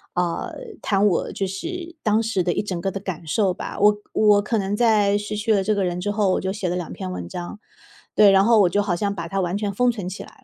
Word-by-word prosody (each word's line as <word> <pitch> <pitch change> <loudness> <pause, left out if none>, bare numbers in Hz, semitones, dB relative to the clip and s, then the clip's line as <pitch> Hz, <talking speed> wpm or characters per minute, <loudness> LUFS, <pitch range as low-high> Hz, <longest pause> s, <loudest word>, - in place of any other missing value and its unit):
呃， 175 -1 -2 0.3
谈 200 0 +2
我 180 - 0
就 195 - -2
是 340 - -6
当 215 0 +2
时 220 -5 0
的 175 - 0
一 - - 0
整 190 -4 -4
个 195 - -1
的 195 - -5
感 185 -4 -6
受 185 +4 +1
吧， - - -7
我 210 +1 +5
我 210 -1 +4
可 220 +2 -1
能 200 0 -1
在 210 -3 +3
失 210 0 -4
去 220 +1 +1
了 195 - +2
这 215 +2 +1
个 200 -2 0
人 180 0 -2
之 205 +2 -1
后， 205 -2 +1
我 - - 0
就 190 +1 -2
写 195 -2 -3
了 175 - -1
两 175 -2 -4
篇 95 - -6
文 90 -1 -6
章， 175 - -7 0.6
对， 205 -2 +7
然 195 0 +5
后 230 -2 +5
我 185 - +5
就 205 +4 +1
好 180 -4 0
像 200 +1 -1
把 170 -1 -5
它 195 +2 -1
完 180 +1 -1
全 205 -1 -2
封 245 +4 +2
存 200 -6 -5
起 190 - -7
来 - - -18
200 Hz, 295 characters per minute, -22 LUFS, 180-210 Hz, 0.6 s, 对